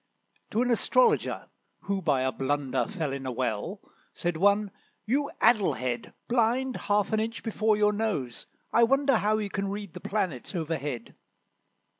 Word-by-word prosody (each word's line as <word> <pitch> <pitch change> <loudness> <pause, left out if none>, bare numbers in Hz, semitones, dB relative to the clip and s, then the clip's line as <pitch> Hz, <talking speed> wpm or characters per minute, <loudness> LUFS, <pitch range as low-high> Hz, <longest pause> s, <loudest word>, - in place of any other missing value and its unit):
To 230 - +1
an 250 - +1
Astrologer, 455 - +2 0.3
who 195 0 -2
by 145 -7 +2
a 130 - +1
blunder 140 +3 -1
Fell 165 -9 -3
in 135 -1 -5
a - - -1
well, 125 - -2 0.3
said 175 -1 -1
one, 200 +3 +3 0.3
"You 280 +6 +1
addle 220 -4 +4
head, 125 +1 -4
Blind 245 +2 +1
half 205 +1 +2
an 215 - +3
inch 225 +1 -3
before 220 -1 +1
your 210 0 +3
nose, 200 - -2 0.3
I 235 - +5
wonder 270 +2 +4
How 215 0 +2
you 210 -2 -3
can 195 0 -2
read 200 -3 -5
the - - -7
planets 185 - -3
overhead." 150 -7 -3
205 Hz, 160 wpm, -28 LUFS, 145-225 Hz, 0.3 s, I